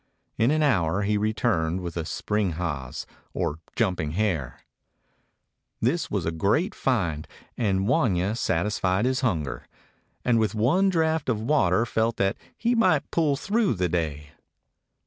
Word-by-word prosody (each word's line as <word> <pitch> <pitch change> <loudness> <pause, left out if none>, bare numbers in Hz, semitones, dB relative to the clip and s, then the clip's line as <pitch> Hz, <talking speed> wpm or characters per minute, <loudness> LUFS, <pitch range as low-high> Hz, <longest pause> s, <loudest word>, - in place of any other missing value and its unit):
In 115 - +2
an 155 +1 +2
hour 100 - +2
he 105 +1 +1
returned 105 -5 0
with 85 -2 -5
a 85 -2 -2
spring 105 0 -1
haas, 75 -6 -4 0.3
or 75 - -1 0.2
jumping 90 -9 0
hare. 80 - -1 1.2
This - - 0
was - - -1
a 80 - 0
great 100 - +1
find, 85 - -1 0.3
and 100 -4 0
Wanya 110 - +2
satisfied 95 0 0
his 130 0 +1
hunger, 85 - -2 0.6
and 120 -2 +3
with 110 -1 0
one 150 - +3
draft 160 -4 +1
of 115 -4 +1
water 115 - +2
felt 115 0 0
that 95 0 +1 0.2
he 235 +1 +1
might 185 - +2
pull 155 -4 +2
through 205 - +1
the 90 -1 0
day. 75 -3 -2
105 Hz, 145 wpm, -26 LUFS, 85-130 Hz, 1.2 s, and